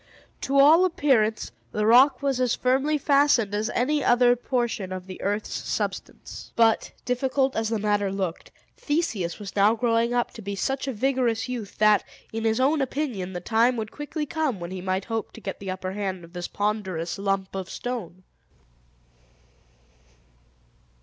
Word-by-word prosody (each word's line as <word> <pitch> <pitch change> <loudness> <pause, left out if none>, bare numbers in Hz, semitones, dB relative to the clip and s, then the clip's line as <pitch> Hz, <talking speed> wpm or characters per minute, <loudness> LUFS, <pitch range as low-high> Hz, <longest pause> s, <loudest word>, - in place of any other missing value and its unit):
To 275 +1 0
all 305 +6 +7
appearance, 255 - +1 0.2
the 210 - -1
rock 255 +6 +5
was 270 -2 0
as 250 -2 +2
firmly 270 +4 +1
fastened 280 -7 +3
as 215 +2 -1
any 290 +4 0
other 245 0 +5
portion 240 -6 -2
of 185 -1 -5
the 185 -1 -9
earth's 205 +2 -2
substance. - - -5
But, 225 -1 +3
difficult 265 +2 0
as 225 -1 0
the 225 - 0
matter 205 -1 0
looked, 190 -4 -4 0.2
Theseus 260 - -2
was 205 -2 -8
now 205 +2 +4
growing 230 0 +1
up 245 0 0
to 225 - -10
be 200 0 -4
such 270 +7 -2
a - - 0
vigorous 250 -1 0
youth, 240 -5 -6
that, 215 -1 +4 0.3
in 225 0 -3
his 225 +1 +2
own 285 +3 +2
opinion, 250 -9 -3
the 175 - -5
time 235 +5 +2
would 220 -1 -4
quickly 300 +1 -4
come 300 - -2
when 170 +1 -6
he 185 -1 -5
might 185 +1 -2
hope 225 -2 -4
to - - -10
get 195 -3 -6
the 195 - -6
upper 185 0 -4
hand 190 -3 -4
of 170 +1 -14
this 175 -1 -4
ponderous 195 -4 -2
lump 195 -1 -1
of 190 -1 -5
stone. 200 -8 -6
225 Hz, 170 wpm, -25 LUFS, 195-260 Hz, 0.3 s, all